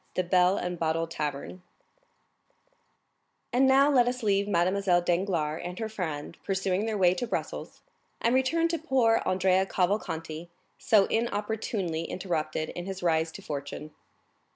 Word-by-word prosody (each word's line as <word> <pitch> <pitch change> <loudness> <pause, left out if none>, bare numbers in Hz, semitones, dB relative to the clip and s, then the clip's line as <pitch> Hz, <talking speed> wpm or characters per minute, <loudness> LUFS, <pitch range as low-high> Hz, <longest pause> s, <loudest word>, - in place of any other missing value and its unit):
The 185 - +1
Bell 180 +1 +3
and 180 -1 -3
Bottle 165 0 0
Tavern 150 +2 -5 1.9
And 260 +2 +4
now 270 +1 +6
let 245 -3 +4
us 250 0 -2
leave 200 -1 +2
Mademoiselle 185 -1 +2
Danglars 170 -4 0
and 180 +1 -6
her 220 -1 -3
friend 165 -6 -5
pursuing 195 +1 0
their 220 -2 -1
way 180 -2 +4
to 210 +7 -3
Brussels, - - -5 0.4
and 235 - +1
return 295 +6 +2
to 335 -1 -1
poor 255 -7 +2
Andrea 190 +1 +2
Cavalcanti, 170 -4 -2 0.3
so 205 -3 +4
inopportunely 210 -6 -2
interrupted 160 -4 -3
in 175 +1 -6
his 190 -1 -6
rise 160 -1 +1
to - - -10
fortune. 145 +1 -6
185 Hz, 140 wpm, -28 LUFS, 165-220 Hz, 1.9 s, now